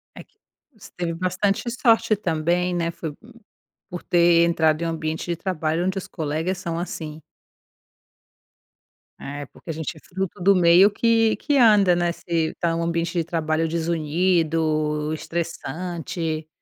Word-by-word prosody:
É - - -9
q - - -40 0.5
você - - -14
teve 170 -2 -2
bastante 185 +3 0
sorte 230 -3 +3
também, 175 0 0
né, 170 -1 -1
foi 160 -2 -6
p - - -24 0.7
por 175 -1 -6
ter 170 -1 +4
entrado 160 -1 +2
em - - -1
um - - -1
ambiente 160 0 -3
de 170 -1 -2
trabalho 165 -2 -2
onde 190 +1 -1
os - - -9
colegas 160 +4 -2
são 170 -2 -4
assim. 160 -3 -6 2.0
É, 145 +1 -6
porque - - -16
a 165 - -1
gente 160 +1 -5
é - - -12
fruto 190 0 -5
do 195 +2 +5
meio 180 +2 +6
que 225 +1 +2
que 285 +3 0
anda, 210 -7 +6
né, 175 0 +1
se - - -18 0.3
está 170 - -2
em - - -1
um 165 - -1
ambiente 170 0 -1
de 165 - +2
trabalho 160 -1 -1
desunido, 160 -2 0
estressante, 165 0 -4
170 Hz, 160 wpm, -23 LUFS, 160-180 Hz, 2.0 s, meio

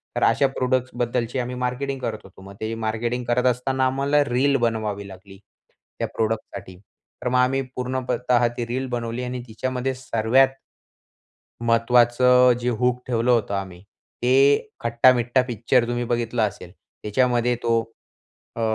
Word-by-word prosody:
तर - - 0
अशा 135 +5 +4
प्रोडक्टसबद्दलची 125 -1 -1
आम्ही 125 0 -3
मार्केटिंग 130 +2 -3
करत 115 -3 -3
होतो. 95 0 -16
मग 95 +1 -11
ते 110 +1 -3
मार्केटिंग 120 +3 -2
करत 120 +1 +1
असताना 130 +2 -1
आम्हाला 140 +3 +2
रील 135 +3 +2
बनवावी 105 -3 -3
लागली 95 0 -13 0.6
त्या - - -1
प्रोडक्टसाठी. 110 -4 -3 0.5
तर - - -2
मग 125 - +1
आम्ही 135 +2 +2
पूर्णपतः 125 -1 0
ती 120 - -2
रील 130 +3 -3
बनवली 120 0 -3
आणि 125 0 -4
तिच्यामध्ये 130 +4 -3
सर्वात 125 +2 +2 1.1
महत्त्वाचं 120 +2 +4
जे 125 - -1
हूक 125 +1 0
ठेवलं 120 0 +1
होतं 115 -4 +1
आम्ही, 95 -2 -6 0.4
ते 125 - +2 0.5
खट्टा-मिट्ठा 120 +1 +3
पिक्चर 120 +1 +1
तुम्ही 120 0 -2
बघितलं 120 0 -1
असेल. 90 -2 -10 0.3
त्याच्यामध्ये 120 +2 +1
तो 115 -1 +2 0.7
अ, 115 - -4
120 Hz, 140 wpm, -23 LUFS, 115-125 Hz, 1.1 s, अशा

